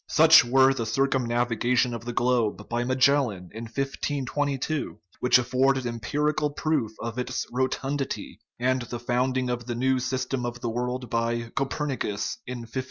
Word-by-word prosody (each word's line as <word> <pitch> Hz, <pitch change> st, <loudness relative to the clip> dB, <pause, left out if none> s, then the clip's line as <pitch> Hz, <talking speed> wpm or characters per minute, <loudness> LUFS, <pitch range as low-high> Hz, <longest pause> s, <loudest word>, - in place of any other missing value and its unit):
Such -, -, +8 dB
were 130 Hz, +2 st, +5 dB
the 115 Hz, -4 st, -3 dB
circumnaviga 120 Hz, -1 st, +1 dB
tion 120 Hz, 0 st, +3 dB
of 115 Hz, 0 st, -6 dB
the 120 Hz, -, -3 dB
globe 120 Hz, -4 st, 0 dB
by 120 Hz, 0 st, -1 dB
Magellan 125 Hz, -7 st, +2 dB
in 115 Hz, +2 st, -6 dB
1522, 140 Hz, +3 st, -2 dB, 0.2 s
which 125 Hz, -, +5 dB
afforded 130 Hz, +1 st, +1 dB
empirical 150 Hz, +6 st, -1 dB
proof 145 Hz, -5 st, -1 dB
of 115 Hz, +1 st, -4 dB
its 125 Hz, -, -2 dB
rotundity, 135 Hz, +2 st, -2 dB, 0.2 s
and 130 Hz, +1 st, +1 dB
the 120 Hz, 0 st, -6 dB
founding 125 Hz, +1 st, 0 dB
of 120 Hz, -1 st, -4 dB
the 120 Hz, -, -2 dB
new 130 Hz, +2 st, +1 dB
system 130 Hz, 0 st, -2 dB
of 120 Hz, 0 st, -4 dB
the 120 Hz, -1 st, -3 dB
world 125 Hz, +1 st, -3 dB
by 115 Hz, 0 st, -1 dB
Copernicus 135 Hz, -6 st, -2 dB
in 125 Hz, -1 st, -5 dB
1543. 115 Hz, +3 st, -5 dB
125 Hz, 155 wpm, -26 LUFS, 120-135 Hz, 0.2 s, Such